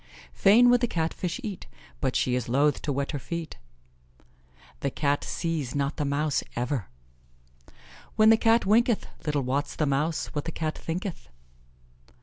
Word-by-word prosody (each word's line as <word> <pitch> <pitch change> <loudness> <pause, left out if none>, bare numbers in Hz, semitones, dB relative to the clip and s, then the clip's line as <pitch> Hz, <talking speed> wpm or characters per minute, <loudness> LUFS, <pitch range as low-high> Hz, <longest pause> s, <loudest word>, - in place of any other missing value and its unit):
"Fain 235 - +6
would 245 -1 +4
the 240 - +2
Cat 165 -5 -1
fish 180 +6 -3
eat, 205 -5 -6 0.3
but 130 -2 -1
she 125 - +1
is 125 -2 -1
loth 145 +4 +2
to 150 - -2
wet 140 0 -2
her 145 - -3
feet." 170 +3 -6 1.2
"The 140 - -1
Cat 145 +1 0
sees 160 -7 -3
not 140 +1 -1
the 150 - -1
mouse 145 +1 0
ever." 125 -3 -2 1.3
"When 220 0 +6
the - - +8
Cat 225 +1 +3
winketh, 225 +2 +3 0.2
little 145 -2 +1
wots 135 +3 -2
the 155 - 0
mouse 150 +3 -1
what 145 - -3
the 165 - -3
Cat 155 -1 -3
thinketh." 175 - -5
150 Hz, 160 wpm, -27 LUFS, 140-190 Hz, 1.3 s, the